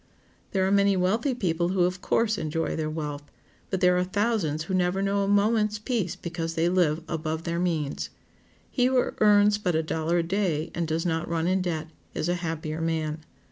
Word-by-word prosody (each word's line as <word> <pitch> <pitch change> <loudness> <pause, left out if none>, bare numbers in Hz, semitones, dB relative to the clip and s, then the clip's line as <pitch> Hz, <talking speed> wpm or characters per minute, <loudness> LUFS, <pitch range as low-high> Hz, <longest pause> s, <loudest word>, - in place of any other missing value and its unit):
There 190 -1 +1
are 190 - +1
many 200 -1 +4
wealthy 220 +9 +1
people 175 -6 0
who, 185 -1 +2
of 180 +1 -1
course, 220 -2 +1
enjoy 160 +1 -2
their 155 -1 -2
wealth, 150 -2 -4 0.5
but 190 -2 -2
there 180 -1 +5
are - - +2
thousands 185 -6 0
who 190 - -5
never 180 +1 +1
know 200 0 +1
a - - -1
moment's 210 +1 +2
peace 210 -5 -2
because 165 -1 -4
they 165 +1 +2
live 170 -3 +2
above 160 0 -3
their 170 0 -2
means. 160 -5 -1 0.6
He 250 - +2
who 255 -1 +2
earns 210 0 +5
but 180 -5 0
a 160 - +2
dollar 160 +2 0
a 170 - +2
day, 170 -3 -1
and 170 -1 -2
does 160 +2 -1
not 165 -1 -1
run 165 -1 0
in 185 +1 +2
debt, 160 -3 -3 0.2
is 155 - -1
a - - +2
happier 160 -1 -3
man. 160 -1 -1
175 Hz, 200 wpm, -26 LUFS, 160-200 Hz, 0.6 s, there